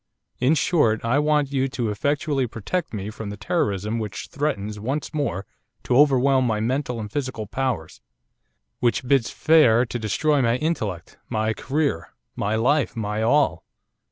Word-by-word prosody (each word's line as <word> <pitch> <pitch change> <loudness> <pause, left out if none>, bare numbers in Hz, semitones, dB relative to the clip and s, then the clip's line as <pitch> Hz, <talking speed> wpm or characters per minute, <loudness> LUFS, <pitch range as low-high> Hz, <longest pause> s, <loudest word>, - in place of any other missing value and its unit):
In 130 +6 +3
short, 135 -9 +2
I 120 +5 +2
want 150 -2 +2
you 135 -1 +1
to 125 -5 -2
effectually 140 +3 0
protect 145 - -3
me 105 -1 -5
from 110 -1 -7
the 105 - -6
terrorism 105 - -1
which 105 -2 -5
threatens 105 -8 -2
once 135 +9 -3
more 100 - -2 0.4
to 125 - 0
overwhelm 135 -2 +4
my 110 -2 0
mental 125 +1 -1
and - - -4
my 105 - -12
physical 130 -6 -3
powers, 115 -8 -3 0.8
which 120 +1 0
bids 135 -3 +3
fair 130 -7 +4
to 120 0 -5
destroy 140 +7 +1
my 115 -1 +2
intellect, 110 - -3
my 110 -1 0
career, 135 - -2 0.2
my 105 +2 -1
life, 135 +6 +1
my 105 -1 -2
all. 140 +6 +2
125 Hz, 155 wpm, -23 LUFS, 110-145 Hz, 0.8 s, overwhelm